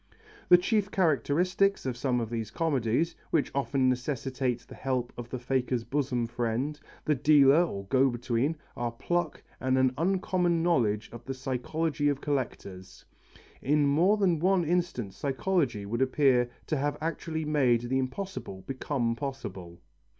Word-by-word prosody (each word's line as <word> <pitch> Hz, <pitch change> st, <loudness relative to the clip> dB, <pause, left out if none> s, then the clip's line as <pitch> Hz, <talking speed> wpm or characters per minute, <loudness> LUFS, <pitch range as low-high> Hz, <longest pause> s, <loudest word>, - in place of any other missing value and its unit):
The 180 Hz, -, +9 dB
chief 200 Hz, +2 st, 0 dB
characteristics 180 Hz, -, +1 dB
of 130 Hz, -2 st, -2 dB
some 125 Hz, 0 st, 0 dB
of 115 Hz, -1 st, -4 dB
these 115 Hz, -2 st, -3 dB
comedies, 145 Hz, +1 st, 0 dB
which 155 Hz, -, +1 dB
often 135 Hz, -1 st, +1 dB
necessitate 130 Hz, -1 st, -1 dB
the -, -, -14 dB
help 130 Hz, -2 st, -2 dB
of 120 Hz, -1 st, -8 dB
the 130 Hz, -, -4 dB
faker's 125 Hz, -1 st, -1 dB
bosom 130 Hz, -3 st, -1 dB
friend, 120 Hz, +5 st, -2 dB, 0.3 s
the 155 Hz, -, +3 dB
dealer 145 Hz, +2 st, +5 dB
or 100 Hz, -, -4 dB
go 135 Hz, +6 st, +3 dB
between, 120 Hz, +5 st, -1 dB, 0.2 s
are 120 Hz, -1 st, -2 dB
pluck 175 Hz, +7 st, -2 dB, 0.2 s
and 130 Hz, 0 st, +1 dB
an 130 Hz, -1 st, +3 dB
uncommon 180 Hz, -2 st, +1 dB
knowledge 115 Hz, -11 st, +1 dB
of 120 Hz, 0 st, -9 dB
the 135 Hz, -, -4 dB
psychology 145 Hz, +4 st, -1 dB
of 140 Hz, -2 st, -1 dB
collectors. 100 Hz, -10 st, -4 dB, 0.6 s
In 145 Hz, +2 st, +2 dB
more 170 Hz, +9 st, +3 dB
than 180 Hz, -6 st, +2 dB
one 185 Hz, 0 st, +2 dB
instance 155 Hz, -, -1 dB
psychology 135 Hz, -, 0 dB
would 115 Hz, +5 st, -2 dB
appear 130 Hz, -2 st, +3 dB, 0.2 s
to 155 Hz, -, -1 dB
have 145 Hz, +2 st, -1 dB
actually 160 Hz, 0 st, -3 dB
made 135 Hz, -6 st, +3 dB
the 130 Hz, +2 st, -1 dB
impossible 130 Hz, -, -5 dB
become 130 Hz, -2 st, -1 dB
possible. 95 Hz, -11 st, -6 dB
135 Hz, 150 wpm, -29 LUFS, 120-160 Hz, 0.6 s, The